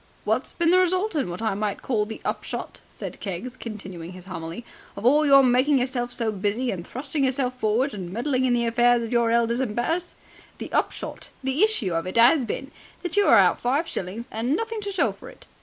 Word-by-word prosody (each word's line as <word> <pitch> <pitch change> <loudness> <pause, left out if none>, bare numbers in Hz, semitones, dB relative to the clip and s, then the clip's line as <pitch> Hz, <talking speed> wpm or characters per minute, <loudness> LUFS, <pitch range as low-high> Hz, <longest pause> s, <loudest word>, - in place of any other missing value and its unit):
"What's - - 0
been 340 0 +1
the 365 - +6
result 370 +3 +1
and 285 - -1
what 175 +6 -5
I 220 - +1
might 205 0 -3
call 215 -5 0
the 220 - -8
upshot," - - -4
said - - -8
Keggs, 200 +6 -5
continuing 190 -7 -8
his 180 -1 -11
homily, 170 +3 -7 0.3
"of 200 - -6
all 295 +4 +5
your 275 -1 +7
making 255 +3 +4
yourself 245 -1 -1
so 230 -3 -1
busy 215 +5 -1
and 175 -3 -6
thrusting 275 +3 -3
of - - +4
yourself 255 -1 -1
forward 235 +6 +1
and 185 -4 -6
meddling 255 +4 0
in 250 - +2
the 235 -1 +1
affairs 240 +1 +3
of 230 - -5
your 235 -1 +3
elders 235 +1 +2
and 235 -5 -2
betters? 330 +9 -1 0.4
The - - -8
upshot - - -2
and 265 - 0
issue 305 - +2
of 165 +2 -1
it 185 - -3
'as 245 +4 +6
been 270 +5 -5 0.3
that 355 - -2
you 410 0 +4
are - - +7
out - - +4
five 275 +7 +1
shillings 200 +6 -4
and 240 +6 0
nothing 455 +2 -3
to 405 -1 -4
show 385 - +1
for - - -12
it. - - -15
240 Hz, 225 wpm, -24 LUFS, 210-275 Hz, 0.4 s, your